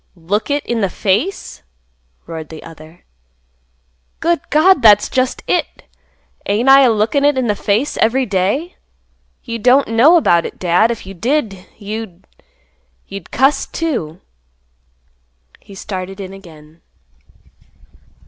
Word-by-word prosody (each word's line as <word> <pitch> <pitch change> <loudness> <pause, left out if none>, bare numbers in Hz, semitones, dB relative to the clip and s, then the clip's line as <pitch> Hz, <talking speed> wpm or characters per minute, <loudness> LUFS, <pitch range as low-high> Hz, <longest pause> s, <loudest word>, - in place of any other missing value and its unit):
"Look 190 - -3
it 285 0 -1
in 235 -2 -2
the 195 - 0
face!" 215 - -2 0.6
roared 160 -2 -8
the 160 -1 -10
other. 160 +1 -15 1.1
"Good 340 -3 0
God! 320 +1 +4
that's 210 -2 +6
just 255 0 -1
it! - - -2 0.6
ain't 220 +6 +1
I 270 +1 +8
a 260 - +5
lookin' 225 +6 +1
it 290 -1 +3
in 260 - 0
the 210 -3 0
face 215 +8 -1
every 255 +4 +1
day? 210 - -2 0.7
You 230 -2 -5
don't 255 +4 +3
know 260 +10 +5
about 170 - +3
it, - - -12
Dad. 180 +5 +2
If 235 -4 -5
you 195 - -9
did, 215 - -2
you—you'd 180 - -11
cuss 270 +4 +1
too." 210 - -4 1.4
He 200 - -15
started 190 0 -7
in 190 -1 -7
again. 165 -4 -15
210 Hz, 130 wpm, -16 LUFS, 180-260 Hz, 1.4 s, I